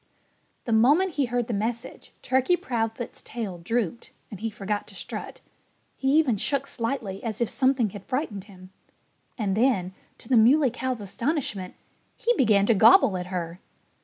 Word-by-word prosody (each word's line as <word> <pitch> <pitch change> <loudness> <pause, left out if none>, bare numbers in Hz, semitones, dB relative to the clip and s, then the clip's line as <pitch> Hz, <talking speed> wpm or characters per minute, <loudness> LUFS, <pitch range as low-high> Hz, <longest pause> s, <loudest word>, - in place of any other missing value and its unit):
The 230 - 0
moment 295 +12 +4
he 285 -2 +1
heard 245 0 -1
the 230 - -4
message 225 +3 -4
Turkey 260 +7 +2
Proudfoot's 230 -3 -3
tail 210 -7 -6
drooped 225 +4 -2 0.2
and 205 - -8
he 225 +2 -2
forgot 205 0 -4
to - - -13
strut. - - -7 0.5
He 270 0 0
even 265 -9 +3
shook 275 +6 0
slightly, 230 -6 -4
as 220 -3 -3
if 235 - 0
something 260 -5 +2
had 200 -1 -10
frightened 245 -8 -3
him. 185 -2 -15 0.7
And 200 -5 -1
then, 210 -6 +1 0.2
to - - -13
the 250 - +4
Muley 260 +4 +5
Cow's 255 -1 -3
astonishment, 205 - -3 0.4
he 480 - +2
began 210 - +4
to 230 - +4
gobble 215 - +6
at 180 0 -4
her. 175 -1 -4
230 Hz, 160 wpm, -26 LUFS, 200-260 Hz, 0.7 s, gobble